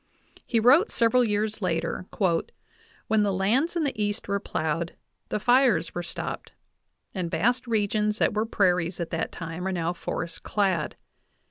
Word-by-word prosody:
He 230 - +2
wrote 280 - +5
sev 230 -1 +2
eral 250 -1 +4
years 215 +1 -1
later: 180 0 -2 1.0
"When 220 -1 +3
the 205 -1 +2
lands 225 - +1
[in 335 - +1
the 270 -7 -2
East] 205 0 -2
were 200 0 0
plowed 165 -2 -2 0.3
the - - -1
fires 245 +3 +3
were 175 - -3
stopped, 170 - -5 0.6
and 180 -4 -2
vast 245 +10 +1
regions 210 -1 +1
that - - +2
were 215 +1 0
prairies 180 -4 +1
at 170 - -4
that 165 - -2
time 165 +2 -5
are - - 0
now 170 -1 -1
forest 170 -1 -5
clad. 190 -7 0
205 Hz, 160 wpm, -26 LUFS, 175-225 Hz, 1.0 s, wrote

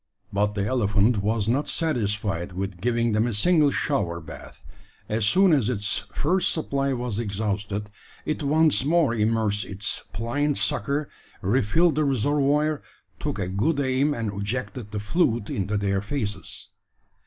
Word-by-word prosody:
But 105 +1 +1
the 100 -1 0
elephant 105 -1 +2
was 105 0 0
not 135 +6 +1
satisfied 105 - -1
with 95 -1 -5
giving 115 0 +1
them 110 +2 +2
a 115 - -2
single 155 - +4
shower 100 - -1
bath. 80 - -11 0.4
As 110 -1 +1
soon 190 - +5
as 130 -7 +2
its 105 -4 0
first 185 - +1
supply 140 -3 -1
was 120 -4 -2
exhausted, 105 -1 -3 0.3
it 155 - -2
once 155 0 +3
more 155 -3 +3
immersed 110 -2 +1
its 100 +1 -2
pliant 145 +6 -1
sucker, 140 +1 0 0.4
re 115 +8 +2
filled 165 +11 +3
the 155 - +1
reservoir, 145 +3 +1 0.4
took - - -3
a 95 -3 -2
good 125 - 0
aim, 140 +2 +1
and 110 -3 -3
ejected 110 +2 -4
the 105 0 -4
fluid 115 - 0
into 100 +1 -1
their 100 -1 0
faces. 105 -4 -4
115 Hz, 150 wpm, -25 LUFS, 105-140 Hz, 0.4 s, soon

